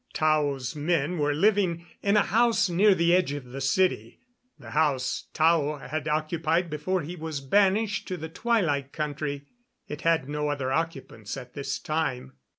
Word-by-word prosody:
Tao's 145 Hz, -5 st, +1 dB
men 160 Hz, +2 st, 0 dB
were 145 Hz, 0 st, +2 dB
living 180 Hz, -2 st, +2 dB, 0.2 s
in 200 Hz, +1 st, +3 dB
a 210 Hz, -, +5 dB
house 230 Hz, -1 st, +3 dB
near 195 Hz, +3 st, +5 dB
the 170 Hz, 0 st, +3 dB
edge 180 Hz, -6 st, +1 dB
of 130 Hz, -4 st, -7 dB
the 135 Hz, +2 st, -6 dB
city 135 Hz, -, 0 dB, 0.4 s
the -, -, -12 dB
house 145 Hz, -5 st, 0 dB
Tao 155 Hz, -2 st, +2 dB
had 150 Hz, +2 st, -5 dB
occupied 160 Hz, +2 st, 0 dB
before 165 Hz, +4 st, -1 dB
he 170 Hz, +5 st, -6 dB
was 160 Hz, -3 st, -5 dB
banished 200 Hz, +8 st, +2 dB
to 185 Hz, -, -3 dB
the 160 Hz, -, -6 dB
Twilight 165 Hz, -, 0 dB
Country. 145 Hz, -2 st, -3 dB, 0.4 s
It 150 Hz, +1 st, -6 dB
had 165 Hz, -5 st, +2 dB
no 150 Hz, 0 st, -2 dB
other 140 Hz, -3 st, -2 dB
occupants 135 Hz, -9 st, -3 dB
at 125 Hz, -2 st, -10 dB
this 140 Hz, -2 st, -3 dB
time. 135 Hz, -5 st, -3 dB
155 Hz, 160 wpm, -27 LUFS, 140-175 Hz, 0.4 s, a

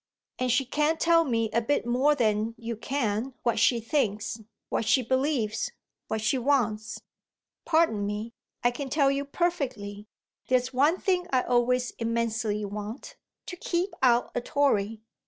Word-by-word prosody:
"And 255 Hz, -1 st, +1 dB
she 260 Hz, +3 st, +2 dB
can't 300 Hz, +5 st, +1 dB
tell 335 Hz, 0 st, +4 dB
me 230 Hz, -4 st, 0 dB
a 235 Hz, -, +2 dB
bit 235 Hz, +1 st, 0 dB
more 260 Hz, +5 st, +3 dB
than 220 Hz, -2 st, 0 dB
you 230 Hz, 0 st, -5 dB
can 240 Hz, 0 st, -2 dB
what 235 Hz, -2 st, +1 dB
she 235 Hz, +1 st, +4 dB
thinks, 225 Hz, -3 st, -1 dB, 0.3 s
what -, -, 0 dB
she 255 Hz, +4 st, +3 dB
believes, 260 Hz, -3 st, 0 dB, 0.4 s
what 220 Hz, 0 st, -2 dB
she 255 Hz, +5 st, +1 dB
wants." 230 Hz, -5 st, 0 dB, 0.6 s
"Pardon 315 Hz, -12 st, +2 dB
me, 210 Hz, +3 st, -4 dB, 0.3 s
I 240 Hz, -, +4 dB
can 270 Hz, +2 st, -5 dB
tell 275 Hz, 0 st, +3 dB
you 275 Hz, 0 st, -1 dB
perfectly. 260 Hz, -, -2 dB, 0.4 s
There's 255 Hz, 0 st, +1 dB
one 295 Hz, +8 st, +3 dB
thing 360 Hz, -2 st, 0 dB
I 255 Hz, -1 st, +3 dB
always 250 Hz, 0 st, +1 dB
immensely 230 Hz, -2 st, -1 dB
want 210 Hz, -, -7 dB, 0.3 s
to 360 Hz, -, -6 dB
keep 355 Hz, +2 st, -2 dB
out 245 Hz, -2 st, +3 dB
a 245 Hz, -, -1 dB
Tory." 225 Hz, -6 st, 0 dB
245 Hz, 155 wpm, -27 LUFS, 220-280 Hz, 0.6 s, tell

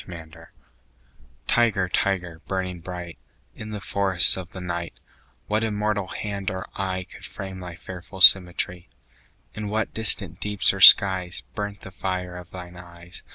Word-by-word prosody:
The 90 Hz, -, -11 dB
Tiger 80 Hz, 0 st, -13 dB, 1.0 s
TIGER, 110 Hz, -6 st, +2 dB
tiger, 90 Hz, -5 st, -2 dB
burning 95 Hz, -2 st, -4 dB
bright 90 Hz, 0 st, -9 dB, 0.3 s
In 110 Hz, -, -9 dB
the 105 Hz, -1 st, -6 dB
forests 95 Hz, -3 st, +4 dB
of 95 Hz, -2 st, -7 dB
the 95 Hz, -, -9 dB
night, 85 Hz, -1 st, -5 dB, 0.5 s
What 105 Hz, +1 st, -1 dB
immortal 105 Hz, -2 st, -2 dB
hand 100 Hz, -2 st, -5 dB
or 95 Hz, 0 st, -6 dB
eye 95 Hz, -1 st, -4 dB
Could -, -, -14 dB
frame 95 Hz, -1 st, -8 dB
thy 90 Hz, -2 st, -9 dB
fearful 90 Hz, +2 st, -11 dB
symmetry? 90 Hz, -2 st, +5 dB, 0.6 s
In 105 Hz, -1 st, -6 dB
what 110 Hz, +2 st, -3 dB
distant 110 Hz, -1 st, 0 dB
deeps 105 Hz, -1 st, +1 dB
or 100 Hz, -, -6 dB
skies 95 Hz, -2 st, +7 dB
5 -, -, -38 dB
Burnt 105 Hz, -1 st, -6 dB
the 95 Hz, -, -11 dB
fire 90 Hz, -1 st, -5 dB
of 90 Hz, 0 st, -10 dB
thine 90 Hz, -1 st, -11 dB
eyes? 85 Hz, -1 st, -10 dB
95 Hz, 155 wpm, -23 LUFS, 90-100 Hz, 1.0 s, skies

